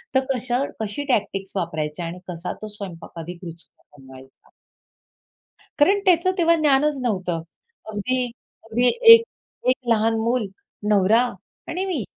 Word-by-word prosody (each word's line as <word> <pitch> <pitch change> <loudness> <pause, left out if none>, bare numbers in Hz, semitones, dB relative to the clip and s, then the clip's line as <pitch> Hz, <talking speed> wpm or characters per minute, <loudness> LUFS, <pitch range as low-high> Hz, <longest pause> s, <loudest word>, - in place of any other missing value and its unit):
तर 265 0 +3
कशा 250 +1 -1 0.2
कशी 220 +6 -3
टॅक्टिक्स 195 -3 -2
वापरायची 155 -4 -3
आणि 170 +2 -6
कसा 175 0 -5
तो 215 - -5
स्वयंपाक 200 -5 -9
अधिक 175 +2 -8
रुचकर 165 -3 -14
बनवायचा. 130 0 -16 1.3
कारण 390 +8 +5
त्याचं 365 0 +4
तेव्हा 335 -1 +4
ज्ञानच 295 -2 +2
नव्हतं. 185 -8 -1 0.5
अगदी 250 +5 -1 0.4
अगदी 240 +3 +1 0.3
एक 460 0 +7 0.5
एक 255 - +4
लहान 225 0 +3
मूल, 235 +1 0 0.5
नवरा 210 +3 +4 0.5
आणि 365 +3 -2
मी 330 - -2
220 Hz, 130 wpm, -22 LUFS, 180-270 Hz, 1.3 s, एक